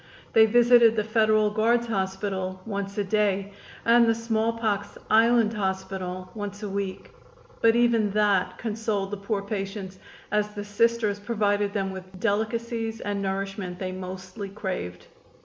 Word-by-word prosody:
They 220 0 +7
visited 235 0 +6
the 215 - +1
Federal 215 -1 +3
Guards 230 +3 +2
Hospital 190 -3 -2
once 200 -1 -4
a 205 - +1
day 200 -1 0 0.3
and 235 0 +6
the 225 - +3
smallpox 225 -2 -1
island 225 0 +5
hospital 190 -2 -3
once 205 -1 -6
a 205 - -3
week, 195 -1 -4 0.5
but 225 0 +5
even 235 -3 +3
that 195 -3 +1
consoled 215 -3 -2
the 205 - -3
poor 200 0 -2
patients, 195 -2 -5 0.3
as 210 0 0
the 205 0 -5
Sisters 215 0 +1
provided 205 -2 0
them 195 -2 -1
with 185 0 -10
delicacies 225 +2 -1
and 205 -1 -2
nourishment 195 -1 -3
they 185 0 -4
mostly 185 +2 -7
craved. 180 - -5
205 Hz, 140 wpm, -26 LUFS, 195-225 Hz, 0.5 s, They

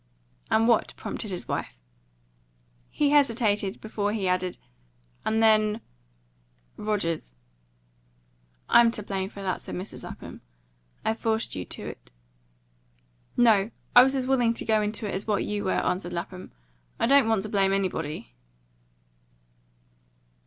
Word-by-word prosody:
"And 225 +1 +3
what?" 235 -2 +2
prompted 215 - -5
his 180 -2 -4
wife. - - -4 1.1
He 290 -1 +1
hesitated 225 -8 +2
before 210 -1 -2
he 200 -4 -1
added, 180 0 0 0.7
"And 220 +1 +1
then 215 0 +4 1.0
Rogers." 170 - -2 1.3
"I'm 235 -1 +6
to 210 - -3
blame 195 -1 -3
for 200 -1 -9
that," 185 -2 -2
said - - -7
Mrs. 185 +3 -7
Lapham. - - -9 0.6
"I 220 - +2
forced 225 0 -1
you 90 - -4
to - - -8
it." - - -9 1.3
"No; 220 -4 +5 0.3
I 245 - +12
was 265 +2 +3
as 260 -1 -1
willing 245 -3 +2
to - - -2
go 220 -1 +3
into 210 +1 -2
it - - -4
as 195 +3 -4
what 205 -2 +1
you 210 -1 -3
were," 190 - +1
answered 180 -1 -1
Lapham. 180 +2 -6 0.5
"I - - +2
don't 275 -2 +5
want 220 -4 +2
to 215 - -5
blame 195 -2 +2
anybody." 165 - -2
210 Hz, 140 wpm, -26 LUFS, 190-225 Hz, 1.3 s, I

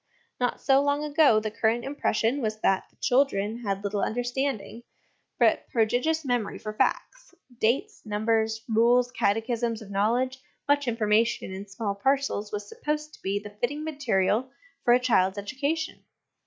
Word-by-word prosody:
Not 245 -1 0
so 270 0 +4
long 285 +1 +1
ago 295 -6 +4
the 215 0 -4
current 230 +2 0
impression 270 -2 0
was 215 -2 -2
that 190 -1 +2
the - - -33
children 235 -4 +1
had 200 -4 -3
little 205 0 -1
understanding, 245 -2 -2 0.6
but - - +3
prodigious 250 +8 +1
memory 245 -4 -1
for 215 0 -6
facts; - - -2 0.2
dates, 275 - 0
numbers, 220 +1 0
rules, 240 +2 +3
catechisms 230 +1 0
of 210 -3 -11
knowledge, 240 +6 +1 0.3
much 285 -1 +2
information 225 -3 +1
in 195 +2 -7
small 200 +1 -3
parcels, 265 -1 0
was 205 -1 -4
supposed 300 +5 -4
to - - -16
be 195 +1 -1
the 205 0 -7
fitting 290 +5 -1
material 255 -6 0 0.3
for 240 - +5
a - - +3
child's 200 -6 +2
education. 280 +10 -3
235 Hz, 150 wpm, -27 LUFS, 210-275 Hz, 0.6 s, for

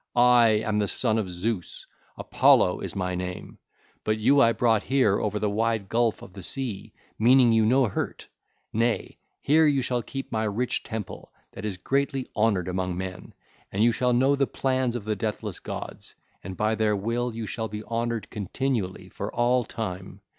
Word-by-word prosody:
I 120 -1 +6 0.2
am 105 -1 0
the 105 - +1
son 110 +1 +1
of 100 -4 -3
Zeus; 90 +1 -4 0.3
Apollo - - +4
is - - -4
my 90 -1 -2
name: 90 0 -6 0.4
but 110 0 0
you 140 +6 +4
I 115 - +6
brought 115 -2 +2
here 125 -7 +2
over 105 -1 -1
the 105 0 0
wide 110 -1 -1
gulf 115 -1 +1
of 90 - -12
the 100 - -9
sea, 120 -3 -3 0.3
meaning 125 +1 +6
you 110 -1 +4
no 130 +3 +4
hurt; 105 - -4 0.5
nay, 115 +1 -1 0.2
here 155 +2 +4
you 140 -3 +2
shall 125 0 -1
keep 135 +3 -7
my 110 -1 0
rich 110 +4 -1
temple 110 -4 -7 0.2
that - - -8
is 100 -4 -3
greatly 135 +5 -1
honoured 105 -5 +1
among 90 -1 -2
men, 95 -1 -7 0.4
and 100 +3 +1
you 120 - +5
shall 125 +2 +1
know 130 +3 +3
the 140 -1 +1
plans 130 -2 0
of 115 -4 -5
the 110 0 -1
deathless 105 +1 -4
gods, - - -7 0.3
and 95 0 -7
by 105 +1 +1
their 110 -1 +1
will 115 +3 -2
you 115 -1 -4
shall 110 +1 -3
be 105 0 -6
honoured 115 0 -3
continually 105 -1 -3
for - - -6
all 125 +1 +2
time. 95 -4 -6
110 Hz, 180 wpm, -26 LUFS, 105-125 Hz, 0.5 s, I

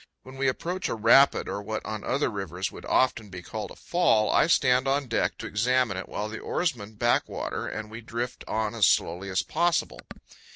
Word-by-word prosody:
When 130 +1 -12
we 135 0 +1
approach 175 +8 -2
a - - -1
rapid, 115 +5 +5
or 100 - -3
what 110 +1 -5
on 110 -1 -5
other 140 - 0
rivers 95 -2 -4
would - - -10
often 115 -5 +1
be 90 -1 -9
called 105 +1 -6
a - - -11
fall, 145 -12 +2
I - - +4
stand 130 -5 +3
on 140 +1 +1
deck 115 -2 -1
to - - -7
examine 120 0 +1
it, 95 - -6
while 105 - -3
the 110 +1 -7
oarsmen 115 - -2
back 120 +3 +1
water, - - -4
and 110 0 -6
we 115 +1 -8
drift 120 +2 -5
on 110 0 -1
as 110 -4 +4
slowly 90 +4 +1
as 95 - 0
possible. 170 +2 0
115 Hz, 205 wpm, -27 LUFS, 105-130 Hz, -, rapid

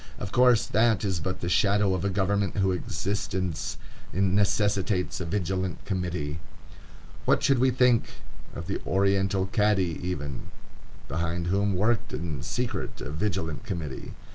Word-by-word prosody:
Of 100 - -5
course, 125 -2 +5
that 110 -1 +2
is 95 -4 0
but 95 +4 -3
the 85 - -2
shadow 100 +2 +3
of 95 - -1
a 100 - +1
government 100 0 0
whose 95 -2 +2
existence 95 -3 -2 0.3
necessitates 100 0 +1
a 85 - -3
Vigilant 95 0 -2
Committee. 90 -6 -2 0.9
What - - +3
should 135 -3 +4
we 130 +1 +4
think 125 -2 +3 0.5
of 85 - -5
the 100 - -3
oriental 95 0 +2
Cadi 105 -6 +2
even, 75 -7 -4 0.6
behind 85 +1 -2
whom 100 +2 +1
worked 110 +5 +1
in 80 -6 -3
secret - - -3
a - - -5
Vigilant 80 -2 -2
Committee? 80 -9 -5
95 Hz, 140 wpm, -27 LUFS, 85-105 Hz, 0.9 s, course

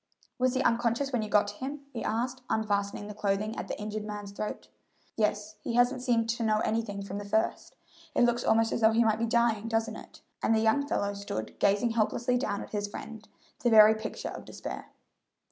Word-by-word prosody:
"Was 255 0 +2
he 260 - +1
unconscious 235 +4 +1
when 240 - +2
you 215 - -4
got 205 0 +4
to 205 - -9
him?" 280 +2 -5
he 235 - -4
asked, 245 +4 -1
unfastening 205 -2 0
the 210 - -7
clothing 205 +2 -1
at - - -5
the - - -5
injured 210 0 -4
man's 210 -1 -6
throat. 210 +1 -5 0.5
"Yes; 210 -1 -1
he 235 - -3
hasn't 245 +1 +3
seemed 235 -3 +2
to 235 +1 -1
know 215 -1 +3
anything 215 -3 -1
from 200 +1 -5
the - - -5
first. 220 +2 0 0.4
It - - +4
looks 240 0 +2
almost 225 0 +3
as - - -1
though 220 0 +5
he 230 +1 +4
might 220 -1 +2
be 230 - +1
dying, 230 -2 +2
doesn't 225 0 0
it?" - - -13 0.2
and 225 - +3
the - - +3
young 225 +6 +2
fellow 205 -7 0
stood 200 - -5
gazing 205 +4 +3
helplessly 235 +2 +1
down 205 -5 -2
at - - -12
his 205 -1 -2
friend, 220 +1 -9 0.3
the 240 - +3
very 215 -1 +8
picture 220 0 -5
of - - -7
despair. - - -7
220 Hz, 215 wpm, -29 LUFS, 210-235 Hz, 0.5 s, very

